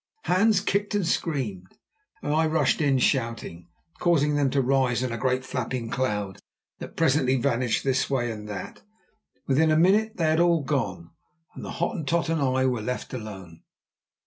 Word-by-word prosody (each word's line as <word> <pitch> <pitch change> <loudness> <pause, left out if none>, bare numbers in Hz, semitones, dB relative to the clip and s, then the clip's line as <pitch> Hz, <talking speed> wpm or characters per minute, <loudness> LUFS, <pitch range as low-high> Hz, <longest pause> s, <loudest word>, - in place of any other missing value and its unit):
Hans 200 +2 +3
kicked 205 0 -1
and 200 -5 0
screamed, 115 - -3 0.5
and 145 - -1
I 160 +1 +3
rushed 160 +1 +1
in 140 -3 +3
shouting, 115 - -1 0.3
causing 150 -4 +2
them 145 -2 +2
to 140 - 0
rise 130 -1 +1
in 130 - -2
a 115 - -3
great, 130 +1 0
flapping 125 -2 -4
cloud 105 -7 -2 0.4
that - - -9
presently 135 -4 +2
vanished 125 -2 0
this 135 -1 0
way 120 -4 0
and 105 -1 -8
that. 100 -3 -7 0.6
Within 155 +4 +3
a 155 - +3
minute 205 +6 +3
they 170 - -1
had 160 - +2
all 170 -3 +3
gone, 105 - -2 0.4
and - - -9
the - - -6
Hottentot 170 -1 -1
and 165 -2 0
I 130 -1 +1
were 125 -3 0
left 125 +4 -4
alone. 95 -8 -8
135 Hz, 170 wpm, -25 LUFS, 115-160 Hz, 0.6 s, Hans